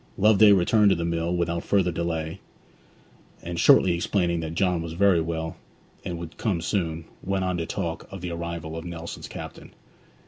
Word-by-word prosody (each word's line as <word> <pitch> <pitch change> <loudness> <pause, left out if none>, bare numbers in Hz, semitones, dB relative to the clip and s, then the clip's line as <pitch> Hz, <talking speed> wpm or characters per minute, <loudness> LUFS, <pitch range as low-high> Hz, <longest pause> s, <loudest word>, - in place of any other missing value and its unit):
Loveday 105 +1 +6
returned 100 +2 +4
to 95 - +4
the 85 0 -2
mill 85 +1 -1
without 85 -1 -1
further 95 -3 +2
delay; 80 -1 -3 1.0
and 85 0 -4
shortly 90 +1 +6
explaining 85 0 0
that 80 0 -5
John 90 -2 +1
was 80 0 -5
very 95 -1 +4
well, 80 0 -4 0.5
and 85 - -4
would 85 -1 -8
come 105 -7 0
soon, 80 -2 -2 0.2
went 95 -1 -1
on 90 -1 -1
to 85 -1 -3
talk 85 -5 -4
of 95 -2 -7
the 90 -1 -4
arrival 85 -1 -5
of 80 - -5
Nelson's 85 -1 -7
captain. - - -9
85 Hz, 175 wpm, -25 LUFS, 85-95 Hz, 1.0 s, Loveday